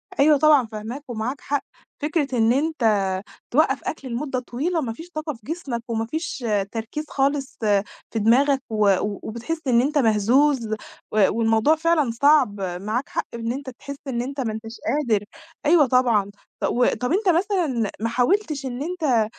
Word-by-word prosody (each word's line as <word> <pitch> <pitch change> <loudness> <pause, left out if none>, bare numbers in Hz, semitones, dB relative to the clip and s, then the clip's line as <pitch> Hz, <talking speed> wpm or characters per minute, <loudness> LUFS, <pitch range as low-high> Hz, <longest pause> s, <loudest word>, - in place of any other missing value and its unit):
أيوه 295 +1 +5
طبعًا 295 -4 +5
فاهماك، 220 +6 -7
ومعاك 240 +4 -3
حق، 285 0 -1 0.4
فكرة 290 -4 0
إن 225 +1 +4
أنت 305 -1 -1 0.7
توقَّف 275 0 +3
أكل 275 -4 -5
لمدة 255 +2 -2
طويلة 305 +8 -2
ما 230 -4 -3
فيش 330 +8 -11
طاقة 310 -2 -4
في 230 - -15
جسمك، 275 -6 -4
وما 225 -1 -1
فيش 310 -2 -4 0.3
تركيز 230 +7 -4
خالص 275 0 -1 0.5
في 225 - -1
دماغك، 265 +5 +4
و 210 -3 +3
وبتحس 235 +9 -4
إن 240 -1 +5
أنت 295 +3 0
مهزوز 240 +2 +3 0.4
و 210 -2 +4
والموضوع 225 +6 +3
فعلًا 315 -6 +2
صعب، 255 -5 +3 0.2
معاك 225 +6 -2
حق - - -2
إن 230 0 -3
أنت 275 +1 -5
تحس 280 +3 -8
إن 240 -3 -1
أنت 275 +2 -5
ما 225 -4 -2
أنتش 225 +1 -7
قادر، 235 -9 +1 0.4
أيوه 310 -1 +6
طبعًا، 235 -6 +2 0.3
ط - - -5
وطَب 250 +1 +1
أنت 390 +1 +2
مثلًا 335 - +1
محاولتش 270 - +1
إن 250 +1 -4
أنت 300 -10 +1
260 Hz, 160 wpm, -23 LUFS, 230-300 Hz, 0.7 s, أيوه